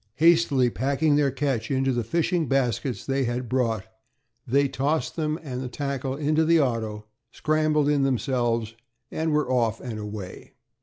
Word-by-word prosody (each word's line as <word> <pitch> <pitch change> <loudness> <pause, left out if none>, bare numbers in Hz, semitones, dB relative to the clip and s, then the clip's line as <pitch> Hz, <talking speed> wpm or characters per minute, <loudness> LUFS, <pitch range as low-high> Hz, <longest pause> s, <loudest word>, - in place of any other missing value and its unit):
Hastily 155 -5 +4
packing 140 +4 +1
their 145 -1 +3
catch 135 -4 -2
in 135 -1 +1
the 125 -3 0
fishing 165 - 0
baskets 125 -3 -1
they 135 -1 0
had 120 +1 -2
brought, 115 -4 0 0.6
they 140 +3 +3
tossed 145 +4 -1
them 155 -1 -1
and 130 -4 -5
the 130 - -4
tackle 135 0 -3
into 155 +2 +1
the 165 +1 +4
auto, 110 -6 -1 0.2
scrambled 155 +1 +1
in 145 -1 +2
themselves, 120 -4 0 0.4
and 160 0 -1
were 150 -3 +1
off 115 -3 +1
and 115 -4 -6
away. 105 -3 -8
135 Hz, 155 wpm, -25 LUFS, 120-150 Hz, 0.6 s, Hastily